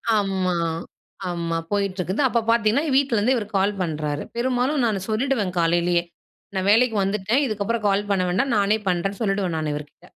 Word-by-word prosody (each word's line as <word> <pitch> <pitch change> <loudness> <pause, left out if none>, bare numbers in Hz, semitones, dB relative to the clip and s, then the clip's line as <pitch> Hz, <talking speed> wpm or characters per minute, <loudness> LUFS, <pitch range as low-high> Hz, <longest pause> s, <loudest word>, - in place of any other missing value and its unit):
ஆமா, 190 -3 0 0.8
ஆமா 170 -1 -2
போயிட்டுருக்குது. 200 +1 -1
அப்ப 235 -1 +1
பார்த்தீங்கன்னா, 230 +4 +3
இ - - -1
வீட்டிலருந்து 255 -3 +2
இவரு 220 -4 -2
கால் 200 +2 +2
பண்றாரு. 150 -3 -2
பெரும்பாலும் 255 +3 +1
நானு 210 -4 0
சொல்லிடுவன், 220 -4 0
காலைலயே. 170 +1 +2 0.5
நான் 190 +1 0
வேலைக்கு 230 +1 +4
வந்துட்டேன், 210 +7 +1
இதுக்கப்புறம் 215 -1 -2
கால் 200 +1 0
பண்ண 190 -2 +2
வேண்டாம், 240 +8 +1
நானே 205 +1 +3
பண்றேன்னு 190 +3 -1
சொல்டுவேன் 195 -5 0
நானு 155 -1 -2
இவருகிட்ட. 145 0 -10
200 Hz, 155 wpm, -23 LUFS, 180-230 Hz, 0.8 s, வேலைக்கு